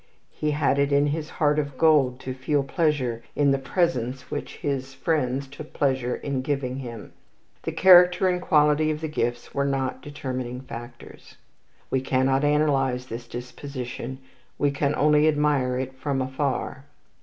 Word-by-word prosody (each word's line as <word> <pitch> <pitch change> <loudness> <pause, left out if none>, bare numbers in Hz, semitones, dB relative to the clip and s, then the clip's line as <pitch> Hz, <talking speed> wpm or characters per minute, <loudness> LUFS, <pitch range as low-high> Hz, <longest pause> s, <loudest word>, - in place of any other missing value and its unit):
He 150 - -2
had 145 -1 +1
it 140 0 +2
in 140 +1 +4
his 150 +2 -2
heart 150 -1 +1
of 145 -3 -4
gold 140 -5 +4
to 130 - -4
feel 140 +2 0
pleasure 135 -6 0
in 145 -1 +3
the 135 - +1
presents 130 -3 -1
which - - -5
his 135 -1 -3
friends 135 -2 -1
took 145 +3 -11
pleasure 130 -3 0
in 140 -2 -3
giving 135 -2 -2
him. 120 -5 -8 0.5
The - - -3
character 180 0 +6
and 180 -1 0
quality 150 -1 +3
of 155 -1 -1
the 160 - -3
gifts 120 -5 -3
were 140 - 0
not 135 -2 -1
determining 130 -4 -5
factors. 120 -1 -11 0.5
We 130 - +1
cannot 135 +1 +1
analyze 140 -4 +2
this 120 0 -7
disposition. 125 +1 -6 0.4
We 145 -1 +2
can 140 +1 0
only 150 +1 +4
admire 145 -4 +2
it 130 0 -3
from 135 +1 -2
afar. 130 0 -2
140 Hz, 155 wpm, -25 LUFS, 130-150 Hz, 0.5 s, character